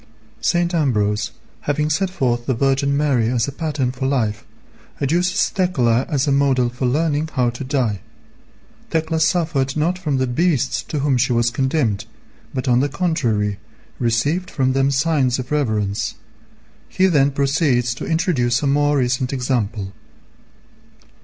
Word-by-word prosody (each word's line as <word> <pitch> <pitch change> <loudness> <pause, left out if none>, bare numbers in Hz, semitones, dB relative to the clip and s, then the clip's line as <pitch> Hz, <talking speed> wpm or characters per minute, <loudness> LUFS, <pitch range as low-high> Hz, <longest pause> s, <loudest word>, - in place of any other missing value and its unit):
St. 175 0 +1
Ambrose 110 -9 +1 0.4
having 150 +1 0
set 185 +5 +1
forth 120 -9 -1
the 130 - +1
Virgin 135 +2 +1
Mary 135 -6 +2
as 120 -2 0
a - - -3
pattern 145 -4 -2
for 130 +1 -3
life, 110 -6 -1 0.6
adduces 175 +7 +1
Thecla 130 -10 +1
as 145 -3 +1
a 145 - +1
model 135 -3 +2
for 125 +1 -2
learning 155 +3 0
how 125 -3 +1
to 120 +3 -7
die. 130 -7 -1 0.9
Thecla 160 0 0
suffered 160 -4 +1
not 175 +4 0
from 150 -6 -1
the 130 - +1
beasts 140 +1 0
to 150 - -2
whom 140 -2 +2
she 125 +1 +1
was 120 0 +2
condemned, 130 -5 0 0.5
but 130 0 -4
on 125 -1 +4
the 140 +2 +1
contrary 115 - 0 0.4
received 140 +10 0
from 130 -1 0
them 135 +1 +2
signs 135 -3 +1
of 130 +1 -6
reverence. 110 -9 -1 0.7
He 185 - +2
then 145 -7 +4
proceeds 140 -3 +1
to - - -7
introduce 145 -7 +1
a - - +1
more 145 +1 +2
recent 125 0 0
example. 120 -7 -2
135 Hz, 150 wpm, -20 LUFS, 120-150 Hz, 0.9 s, on